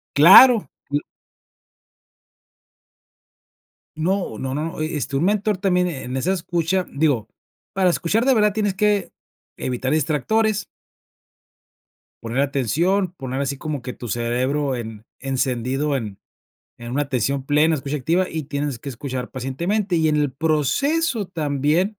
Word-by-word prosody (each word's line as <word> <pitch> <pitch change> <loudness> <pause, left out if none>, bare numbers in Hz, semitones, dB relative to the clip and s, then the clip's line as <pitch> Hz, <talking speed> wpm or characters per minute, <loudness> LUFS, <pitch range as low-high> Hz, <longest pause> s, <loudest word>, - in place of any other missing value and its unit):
Claro, 190 - +8 0.2
l. 145 +1 +1 3.0
No, 175 - -1
no, 130 0 -3
no, 155 +1 -4
e 155 0 -2
este, 140 -1 -3
un 155 - +1
mentor 210 0 +1
también 180 -2 +2
en 155 -7 -4
en 130 - -3
esa 180 +8 0
escucha, 175 0 -1
digo, 140 -7 0 0.4
para 190 -2 +2
escuchar 210 +8 +1
de 265 -1 +4
verdad 210 -2 +3
tienes 205 -2 0
que, 205 0 +1 0.4
evitar 130 +2 -2
distractores 200 - +1 1.6
poner 120 +4 -1
atención, 165 - +1
poner 135 -4 -4
así 140 0 -3
como 150 -4 -4
que 125 - -5
tu 120 - -8
cerebro 130 +5 -1
en, 110 -2 -7 0.2
encendido 135 +1 -1
en 105 -7 -4 0.6
en 120 +1 -7
una 145 +2 +1
atención 135 0 -1
plena, 150 +3 +3
escucha 140 +1 -3
activa 170 +7 +1
y 160 -2 -4
tienes 140 -3 -3
que 140 - -8
escuchar 125 0 -5
pacientemente, 170 - -1
y 160 -1 +2
en 150 - +2
el 145 -3 0
proceso 200 - 0
también 160 +5 0
150 Hz, 135 wpm, -22 LUFS, 130-185 Hz, 3.0 s, Claro